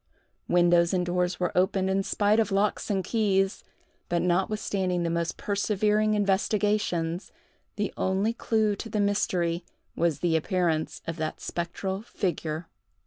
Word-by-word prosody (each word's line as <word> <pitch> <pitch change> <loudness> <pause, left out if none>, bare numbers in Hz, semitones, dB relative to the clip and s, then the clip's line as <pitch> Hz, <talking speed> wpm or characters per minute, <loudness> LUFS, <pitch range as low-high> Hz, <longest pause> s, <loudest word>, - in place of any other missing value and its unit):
Windows 175 0 +4
and 180 -1 +1
doors 180 0 0
were 180 -1 -1
opened 190 +1 +2
in 190 +1 +1
spite 205 +2 +2
of 220 -4 +1
locks 200 +1 0
and 195 -2 0
keys; 195 -3 +1 0.5
but 175 0 +1
notwithstanding 185 0 0
the 170 - 0
most 170 0 -1
persevering 210 +1 +1
investigations, 200 -3 0 0.4
the 205 -1 -2
only 195 +4 +1
clew 220 -3 +1
to 225 - -6
the 215 - -1
mystery 180 -4 +1 0.3
was 170 -4 0
the 170 -2 +2
appearance 160 -1 0
of 165 0 -4
that 155 -1 -3
spectral 190 +3 -3
figure. 165 -6 -3
190 Hz, 140 wpm, -27 LUFS, 175-205 Hz, 0.5 s, Windows